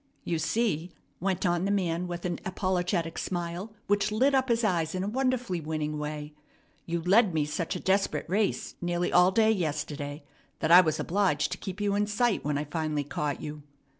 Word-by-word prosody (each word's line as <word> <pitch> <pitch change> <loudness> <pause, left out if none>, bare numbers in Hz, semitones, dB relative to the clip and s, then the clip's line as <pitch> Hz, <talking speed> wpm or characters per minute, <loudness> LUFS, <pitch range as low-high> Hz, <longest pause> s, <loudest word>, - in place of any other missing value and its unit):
"You 165 -2 -1
see," 175 -2 0 0.3
went 190 +1 -1
on 175 +1 +1
the - - 0
man 180 -3 0
with 175 0 -5
an 175 -1 -2
apologetic 180 -2 -1
smile, 175 +3 -3
which 205 +1 +1
lit 260 +6 +3
up 265 -1 +2
his 235 0 +2
eyes 170 -5 +1
in 185 - -1
a - - -2
wonderfully 250 -6 0
winning 155 -1 -3
way, 150 0 -5 0.5
"you 170 -1 -2
led 195 0 +4
me 150 -2 +2
such 150 +2 -3
a - - -3
desperate 195 +1 +1
race 200 +3 0
nearly 175 0 -1
all 180 +1 +6
day 220 +3 +4
yesterday 150 -5 -3 0.3
that 160 - 0
I 180 +2 +11
was 155 -4 0
obliged 165 -6 +1
to - - -4
keep 190 +1 -6
you 205 -1 +1
in 205 +1 +1
sight 225 +1 +1
when 145 0 0
I 145 - -1
finally 150 -1 -2
caught 145 0 -3
you." 150 0 -6
175 Hz, 195 wpm, -28 LUFS, 155-205 Hz, 0.5 s, I